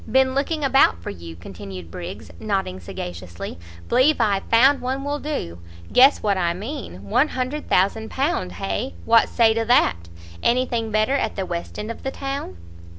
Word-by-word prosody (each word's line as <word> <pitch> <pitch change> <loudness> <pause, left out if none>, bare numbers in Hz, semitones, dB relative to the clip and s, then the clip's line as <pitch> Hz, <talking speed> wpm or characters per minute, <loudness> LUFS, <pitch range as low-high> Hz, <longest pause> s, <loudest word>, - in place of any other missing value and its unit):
"Been 260 +1 +4
looking 295 +3 -1
about 270 - +4
for - - -4
you!" 85 -3 -9
continued 90 0 -9
Briggs, 175 +1 -7
nodding 195 - -2
sagaciously; 85 -1 -7 0.3
"believe 260 +5 +4
I've 205 -4 +1
found 265 +5 +5
one 265 +2 -2
will 290 +1 -2
do. 85 - -4 0.3
Guess 270 +3 +6
what 200 -3 +1
I 170 -1 +1
mean; 215 - -6
£100,0000 255 - 0
hay? 95 -1 -3
what 230 - +5
say 225 -2 +4
to 230 0 0
that? 235 - +4 0.4
any 250 +2 +3
thing 230 -3 -2
better 215 +4 +2
at 280 - 0
the 195 - -2
west 170 -1 -5
end 210 +2 -4
of - - -9
the 270 - -2
town?" 270 - -5
220 Hz, 160 wpm, -23 LUFS, -, 0.4 s, Guess